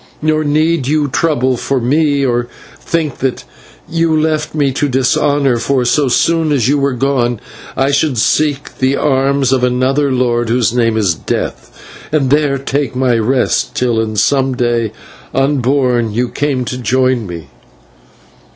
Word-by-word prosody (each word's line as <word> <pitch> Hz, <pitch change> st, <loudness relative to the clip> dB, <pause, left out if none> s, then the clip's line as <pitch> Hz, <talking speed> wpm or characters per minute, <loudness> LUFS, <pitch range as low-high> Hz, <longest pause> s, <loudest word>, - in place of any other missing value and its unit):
Nor 155 Hz, 0 st, 0 dB
need 155 Hz, -1 st, +1 dB
you 150 Hz, 0 st, +1 dB
trouble 130 Hz, -4 st, 0 dB
for 135 Hz, +2 st, -1 dB
me, 140 Hz, +3 st, +1 dB
or 120 Hz, -1 st, 0 dB, 0.3 s
think 160 Hz, -5 st, -2 dB
that 130 Hz, -1 st, -2 dB, 0.4 s
you 165 Hz, -1 st, +1 dB
left 155 Hz, 0 st, -1 dB
me 145 Hz, -3 st, +1 dB
to 145 Hz, +2 st, -1 dB
dishonour, 135 Hz, +1 st, +1 dB
for, 125 Hz, +2 st, 0 dB
so 140 Hz, +3 st, +2 dB
soon 160 Hz, +5 st, +1 dB
as 130 Hz, -6 st, +1 dB
you 145 Hz, +2 st, +2 dB
were 140 Hz, -1 st, 0 dB
gone, 125 Hz, -3 st, 0 dB, 0.4 s
I 135 Hz, +2 st, +2 dB
should 145 Hz, -2 st, +1 dB
seek 145 Hz, +5 st, 0 dB
the 130 Hz, +1 st, +2 dB
arms 135 Hz, -1 st, +1 dB
of 130 Hz, -1 st, 0 dB
another 130 Hz, +3 st, +1 dB
lord 120 Hz, -2 st, 0 dB
whose 120 Hz, -1 st, +1 dB
name 115 Hz, -2 st, +1 dB
is 100 Hz, -6 st, +2 dB
Death, -, -, -5 dB, 0.3 s
and 140 Hz, -4 st, +1 dB
there 145 Hz, -1 st, +2 dB
take 135 Hz, 0 st, -2 dB
my 125 Hz, -2 st, +1 dB
rest, 125 Hz, +3 st, 0 dB
till 120 Hz, -3 st, 0 dB
in 110 Hz, -1 st, -3 dB
some 135 Hz, +4 st, +1 dB
day 120 Hz, -3 st, 0 dB, 0.4 s
unborn 130 Hz, -3 st, +1 dB
you 120 Hz, +3 st, -1 dB
came 140 Hz, -3 st, -2 dB
to 125 Hz, +1 st, -5 dB
join 125 Hz, -1 st, 0 dB
me." 85 Hz, -5 st, -8 dB
130 Hz, 155 wpm, -14 LUFS, 120-145 Hz, 0.4 s, so